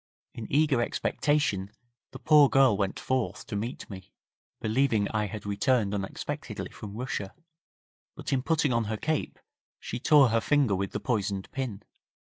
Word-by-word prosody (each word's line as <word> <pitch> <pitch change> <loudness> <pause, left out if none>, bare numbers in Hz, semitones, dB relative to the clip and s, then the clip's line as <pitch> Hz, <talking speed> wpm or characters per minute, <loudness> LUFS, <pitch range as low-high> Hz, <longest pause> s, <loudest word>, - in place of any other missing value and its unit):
In 115 - -8
eager 145 -3 +3
expectation 130 -6 0 0.4
the - - -9
poor 150 -3 +6
girl 135 -5 +5
went 100 -1 -2
forth 130 -2 -2
to - - -6
meet 115 +5 -4
me, 95 -2 -10 0.5
believing 110 -2 +1
I 105 -1 -1
had 105 0 -7
returned 105 +1 +1
unexpectedly 95 -1 -5
from 105 -1 -9
Russia, 110 -6 -4 0.8
but - - -4
in 130 - +2
putting 150 -2 +1
on 115 -1 +1
her 110 +1 -3
cape, 155 +6 -2 0.4
she 120 - -5
tore 145 -1 +6
her 115 0 +2
finger 140 -6 +2
with 95 +1 -2
the - - -2
poisoned 100 -5 -2
pin. 120 -6 -4
115 Hz, 155 wpm, -28 LUFS, 100-135 Hz, 0.8 s, poor